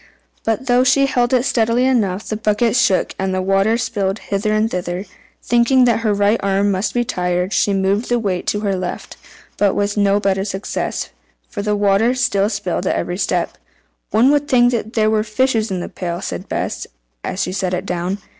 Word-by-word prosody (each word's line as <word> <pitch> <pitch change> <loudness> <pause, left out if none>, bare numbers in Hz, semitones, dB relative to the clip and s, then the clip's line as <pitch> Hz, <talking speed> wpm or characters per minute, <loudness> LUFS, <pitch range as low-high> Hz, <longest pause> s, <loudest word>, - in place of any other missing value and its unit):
But 225 +3 -1
though 250 0 +3
she 275 +2 +4
held 245 -3 +1
it 255 -1 +2
steadily 230 +1 +2
enough, 210 -7 0
the 215 - -2
bucket 215 +2 +1
shook, 235 -6 +2
and 190 0 -1
the - - 0
water 195 +4 +2
spilled 205 -5 -1
hither 205 0 -2
and 215 +1 +2
thither. 180 -1 -4 0.4
Thinking 240 +2 +3
that 235 -2 +2
her 225 -2 0
right 205 +2 +2
arm 200 +1 +1
might 190 +2 -1
be 240 0 0
tired, 180 -1 -1
she 205 - +2
moved 195 +3 0
the 245 - +2
weight 195 -6 -2
to 205 - 0
her 200 -2 0
left, 180 -1 -5 0.4
but 200 -2 +2
with 205 +1 -1
no 200 0 +3
better 195 -1 0
success, 195 -1 -3 0.4
for 205 - -5
the 210 0 0
water 205 +4 +2
still 210 -5 +1
spilled - - -2
at - - +1
every - - -3
step. - - -1 0.5
"One 235 +6 +4
would 290 0 +1
think 245 -2 +4 0.2
there 215 -1 +3
were 215 -1 +2
fishes 225 0 0
in 185 -2 -2
the - - -5
pail," 175 -1 -4
said - - -6
Bess, - - -3 0.4
as 185 - -2
she - - -3
set 185 -1 -1
it 180 +2 -4
down. 180 +1 -2
205 Hz, 200 wpm, -19 LUFS, 195-235 Hz, 0.5 s, she